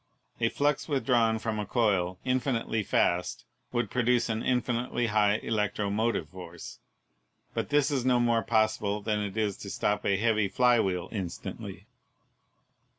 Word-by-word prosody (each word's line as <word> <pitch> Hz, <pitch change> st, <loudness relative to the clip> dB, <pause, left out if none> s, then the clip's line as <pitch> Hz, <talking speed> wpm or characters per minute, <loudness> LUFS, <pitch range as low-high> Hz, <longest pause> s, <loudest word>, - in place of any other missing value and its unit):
A 115 Hz, -1 st, +2 dB
flux 145 Hz, +2 st, 0 dB
withdrawn 125 Hz, -6 st, +2 dB
from 110 Hz, -1 st, -3 dB
a 105 Hz, -, -2 dB
coil 95 Hz, -6 st, +1 dB
infinitely 125 Hz, -3 st, 0 dB
fast 90 Hz, -3 st, 0 dB, 0.3 s
would 120 Hz, -1 st, -1 dB
produce 125 Hz, -1 st, +2 dB
an 110 Hz, 0 st, -1 dB
infinitely 120 Hz, -1 st, 0 dB
high 105 Hz, -1 st, +2 dB
elec 105 Hz, -3 st, 0 dB
tromotive 105 Hz, -3 st, 0 dB
force, 85 Hz, -1 st, -10 dB, 0.7 s
but -, -, -2 dB
this 145 Hz, 0 st, +2 dB
is 135 Hz, -4 st, 0 dB
no 125 Hz, -1 st, +3 dB
more 120 Hz, -1 st, +2 dB
possible 110 Hz, -2 st, 0 dB
than 105 Hz, -1 st, 0 dB
it 105 Hz, 0 st, -4 dB
is 105 Hz, -3 st, 0 dB
to 100 Hz, -, -8 dB
stop 105 Hz, +1 st, -1 dB
a 100 Hz, -, +2 dB
heavy 110 Hz, -1 st, +2 dB
fly 125 Hz, +3 st, +3 dB
wheel 90 Hz, -4 st, -1 dB
instantly. 95 Hz, -6 st, -6 dB
110 Hz, 150 wpm, -28 LUFS, 100-120 Hz, 0.7 s, no